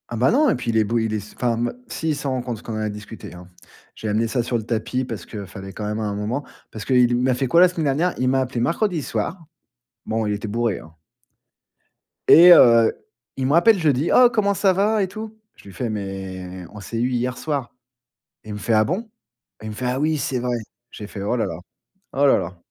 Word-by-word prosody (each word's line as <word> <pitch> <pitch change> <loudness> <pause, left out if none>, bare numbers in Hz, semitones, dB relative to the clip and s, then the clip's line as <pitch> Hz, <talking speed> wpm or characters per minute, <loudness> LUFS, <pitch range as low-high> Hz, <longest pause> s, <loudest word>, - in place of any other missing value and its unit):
Ah 120 - -4
bah 125 +4 +3
non 290 +3 +4
et - - +2
puis 120 -2 -3
il 110 - 0
est 110 - +4
bo 115 +3 -1
il 110 -1 -1
est - - 0
s 105 +1 -12
enfin, 120 -2 +1
hem, 120 +1 -1
si 160 - -3
il 155 - +1
s'en 140 -1 -3
rend 130 -1 -1
compte 120 -1 -4
parce 110 - -12
qu'on 115 - -6
en - - -3
a 110 - -1
discuté, 105 +1 -9
hein. 90 0 -12 0.5
J'ai 110 - -5
amené 110 +2 +1
ça 120 +1 -1
sur 120 0 -1
le 110 - -5
tapis 115 +3 -2
parce 110 -8 -7
qu'il 105 -3 -7
fallait, 95 +1 -9
quand 105 - -5
même 105 +1 -3
à - - -2
un 105 -1 -2
moment. 110 +7 -3 0.3
Parce 110 -2 -7
qu'il 125 -2 +3
m'a 130 +1 +2
fait 130 +2 -1
quoi 170 +7 +5
la 185 - +8
semaine 170 -3 -3
dernière? 175 +4 +1
Il 130 - 0
m'a 135 +1 +2
appelé 130 -1 -3
mercredi 170 - 0
soir, 160 - -4 0.6
bon 110 0 -1
il 105 - 0
était 105 +2 -4
bourré 115 -1 -1
hein 80 0 -15 1.3
et 175 +3 +9
heu, 115 -6 +6 0.4
il 135 - -1
me 140 - +1
rappelle 195 +5 +5
jeudi: 150 -2 +1
«Oh 250 -1 +7
comment 205 -3 +1
ça 195 0 +2
va, 210 +3 +2
et - - -1
tout?» 220 +3 -8 0.2
Je - - -19
luis 100 - -12
fais: 120 +5 -3
«Mais 95 -3 -6
on 105 - -10
s'est 115 +4 -5
eu 125 +2 +1
hier 125 +1 -1
soir» 145 -5 -3 0.7
et 110 - -13
il - - -4
me 105 - -6
fait: 115 - -1
«Ah 110 0 +5
bon?» 195 - -3 0.5
Il 110 - -6
me - - -6
fait: 125 - -4
«Ah 125 +2 -1
oui, 155 +1 +1
c'est 135 -3 -2
vrai!» 125 0 -1 0.4
J'ai 105 - -8
fait: 100 - -8
«Oh 105 +4 0
là 115 - 0
là! 85 - -4 0.6
Oh 140 +1 +2
là 140 - +5
là!» 90 +2 -5
120 Hz, 260 wpm, -22 LUFS, 105-145 Hz, 1.3 s, et